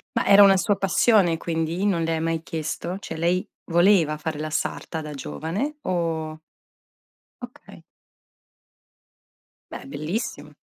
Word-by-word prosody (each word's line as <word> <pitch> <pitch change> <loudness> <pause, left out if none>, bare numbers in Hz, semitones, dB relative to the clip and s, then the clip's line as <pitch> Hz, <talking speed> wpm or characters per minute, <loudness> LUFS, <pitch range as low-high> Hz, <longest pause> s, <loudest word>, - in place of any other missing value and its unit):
Ma - - +1
era 200 0 +7
una 195 -1 +6
sua 205 +2 +1
passione, 195 -2 +3
quindi? 165 +3 -2
Non 175 -5 +1
le 165 - 0
hai 160 - -1
mai 165 0 -1
chiesto? 165 +3 -4
Cioè, 165 - -7
lei 175 +3 0 0.2
voleva 170 -3 +3
fare 155 -1 -4
la 155 0 -3
sarta 160 +1 -3
da 150 -1 -7
giovane? 190 - -4
O 160 -3 -2 1.0
Okay. - - -12 1.9
Beh, - - -8
bellissimo. 155 - -4
165 Hz, 130 wpm, -24 LUFS, 160-190 Hz, 1.9 s, era